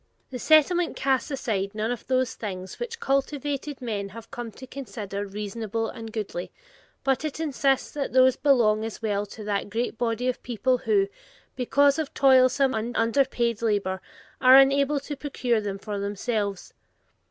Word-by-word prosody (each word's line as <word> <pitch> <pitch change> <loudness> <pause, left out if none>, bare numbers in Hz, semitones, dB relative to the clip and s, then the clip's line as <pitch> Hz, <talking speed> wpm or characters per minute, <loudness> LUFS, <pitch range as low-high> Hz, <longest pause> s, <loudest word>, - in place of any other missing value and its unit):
The 250 - -5
Settlement 315 +5 +4
casts 270 +1 0
side 200 -3 -2
none 220 +2 -1
of 245 - -5
those 255 -1 +1
things 190 -3 -6
which 475 -1 -5
cultivated 275 - -2
men 205 -4 -3
have 230 +3 -11
come 240 -1 -5
to 260 - -10
consider 210 -7 -6
reasonable 210 +2 -3
and 225 -2 -8
goodly, 205 -5 -4 0.5
but 270 +1 +1
it 310 -1 -4
insists 275 -3 +1
that 285 -2 -3
those 260 0 +5
belong 225 -7 +3
as 225 0 -6
well 205 -1 -1
to 215 +2 -10
that 205 -1 -2
great 230 +1 -2
body 240 +1 0
of 255 - -1
people 245 +2 0
who, 400 -2 +4 0.5
because 280 +4 +3
of 310 -3 -4
toilsome 265 0 +5
and 225 +2 -3
underpaid 235 -1 +1
labor, 200 -4 0 0.4
are 255 0 +8
unable 275 +1 +5
to 290 - -6
procure 250 -5 -1
them 200 -2 -4
for 205 0 -5
themselves. 205 0 -3
240 Hz, 160 wpm, -26 LUFS, 215-275 Hz, 0.5 s, are